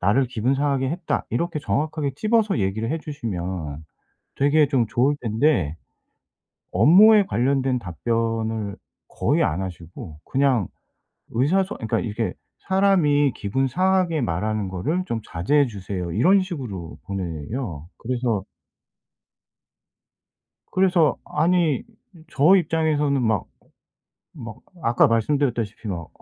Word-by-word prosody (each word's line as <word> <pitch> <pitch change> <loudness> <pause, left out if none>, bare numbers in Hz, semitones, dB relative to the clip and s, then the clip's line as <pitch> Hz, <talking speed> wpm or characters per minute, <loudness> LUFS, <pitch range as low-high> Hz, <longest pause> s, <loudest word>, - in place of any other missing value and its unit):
나를 105 +9 +2
기분 125 +1 0
상하게 135 -1 0
했다." 170 0 -2
이렇게 170 -2 -1
정확하게 150 -1 -1
집어서 215 - +1
얘기를 110 +5 -1
해 165 - -1
주시면 90 - -5 0.5
되게 145 +2 +4
좀 125 -6 +2
좋을 125 +7 +2
텐데 110 - +1 1.0
업무에 195 - +7
관련된 130 -1 +1
답변을 110 +2 -2 0.3
거의 - - 0
안 80 +5 -1
하시고 85 -3 -8
그냥 130 -7 +1 0.6
의사 150 +12 +2
소 200 - -7
어 - - -18
그러니까 110 - -1
이게 115 0 -2 0.4
"사람이 175 -8 +3
기분 130 +7 -1
상하게 185 0 +1
말하는 105 +1 -1
거를 150 - -2
좀 115 -6 -2
자제해 140 - +2
주세요." 95 -5 -5
이런 185 - +4
식으로 120 - -6
보내요. 85 - -5
그래서 120 -4 -2 2.3
그래서 180 -4 +3
아니 165 -2 +1 0.5
저 155 +7 +5
입장에서는 155 -6 +1
막 110 -5 0 0.9
막 115 -8 -9 0.2
아까 120 -2 +4
말씀드렸다시피 115 -3 -1
막 85 -4 -5
125 Hz, 260 characters per minute, -23 LUFS, 105-150 Hz, 2.3 s, 업무에